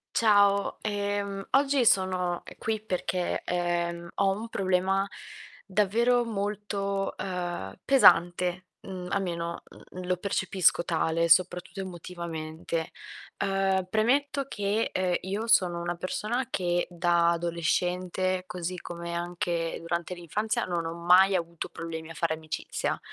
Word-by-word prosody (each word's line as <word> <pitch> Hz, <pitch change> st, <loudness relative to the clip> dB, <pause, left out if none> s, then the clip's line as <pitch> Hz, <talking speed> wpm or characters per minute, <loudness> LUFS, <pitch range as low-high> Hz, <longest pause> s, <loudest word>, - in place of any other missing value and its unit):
Ciao, 200 Hz, -2 st, +4 dB
ehm, 205 Hz, -1 st, -2 dB
oggi 275 Hz, -1 st, +4 dB
sono 185 Hz, -3 st, +2 dB, 0.2 s
qui 220 Hz, -1 st, -1 dB
perché, 185 Hz, -3 st, -2 dB
ehm, 170 Hz, -1 st, -1 dB
ho 195 Hz, -, +2 dB
un 210 Hz, +4 st, -2 dB
problema 190 Hz, -1 st, +1 dB, 0.6 s
davvero 225 Hz, +5 st, +2 dB
molto, 200 Hz, -2 st, -2 dB
uhm, 175 Hz, -, -4 dB
pesante, 180 Hz, -8 st, +4 dB, 0.2 s
mhmm, 185 Hz, -2 st, -7 dB
almeno, 170 Hz, -3 st, -2 dB
mhmm, 185 Hz, 0 st, -10 dB
lo 180 Hz, 0 st, 0 dB
percepisco 185 Hz, -2 st, +2 dB
tale, 165 Hz, 0 st, +1 dB
soprattutto 180 Hz, +2 st, +3 dB
emotivamente. 165 Hz, -3 st, -5 dB, 0.5 s
Uhm, 195 Hz, -1 st, +1 dB
premetto 275 Hz, +7 st, +1 dB
che, 205 Hz, -1 st, -1 dB
ehm, 185 Hz, -1 st, +1 dB
io 200 Hz, +5 st, -3 dB
sono 180 Hz, -6 st, +4 dB
una 175 Hz, 0 st, -2 dB
persona 215 Hz, +8 st, -2 dB
che 175 Hz, -3 st, 0 dB
da 170 Hz, -1 st, +3 dB
adolescente, 180 Hz, +2 st, 0 dB
così 180 Hz, 0 st, -4 dB
come 170 Hz, -1 st, -6 dB
anche 170 Hz, -1 st, -2 dB
durante 170 Hz, +1 st, -3 dB
l'infanzia, 190 Hz, +6 st, -2 dB
non 170 Hz, -2 st, -2 dB
ho 165 Hz, -, -3 dB
mai 180 Hz, +3 st, +5 dB
avuto 170 Hz, -2 st, -2 dB
problemi 165 Hz, -1 st, -6 dB
a -, -, -7 dB
fare 165 Hz, -1 st, 0 dB
amicizia. 155 Hz, -1 st, -3 dB
180 Hz, 120 wpm, -28 LUFS, 170-200 Hz, 0.6 s, mai